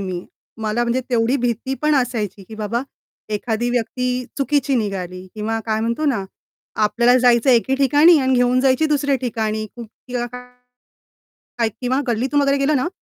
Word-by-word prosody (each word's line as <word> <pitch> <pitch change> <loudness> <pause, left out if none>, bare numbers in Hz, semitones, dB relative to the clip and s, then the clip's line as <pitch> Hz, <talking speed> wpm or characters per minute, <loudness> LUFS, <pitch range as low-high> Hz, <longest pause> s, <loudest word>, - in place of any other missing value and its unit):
मी. 185 -2 -4 0.4
मला 215 +2 0
म्हणजे 240 +2 0
तेवढी 235 +3 +2
भीती 245 +1 -2
पण 305 0 +3
असायची, 225 -7 -1
की 220 - -9
बाबा 220 +3 -2 0.5
एखादी 230 +2 -1
व्यक्ती 250 +1 -1
चुकीची 280 -1 +1
निघाली 185 -4 -4
किंवा 220 +1 -2
काय 220 0 0
म्हणतो 235 +7 -1
ना 225 -9 0 0.6
आपल्याला 235 +4 +3
जायचंय 245 +1 +4
एके 265 +3 0
ठिकाणी 290 +5 +5
आणि 260 -1 +2
घेऊन 245 +1 +3
जायची 270 +4 +3
दुसऱ्या 285 -2 +1
ठिकाणी 220 -3 -2
किंवा 240 +1 -6
काय 250 +1 -10 1.1
काय 230 -1 +2
किंवा 255 +2 0
गल्लीतून 255 +5 +1
वगैरे 280 0 +2
गेलं 280 +2 +2
ना 255 - 0
245 Hz, 155 wpm, -20 LUFS, 220-265 Hz, 1.1 s, ठिकाणी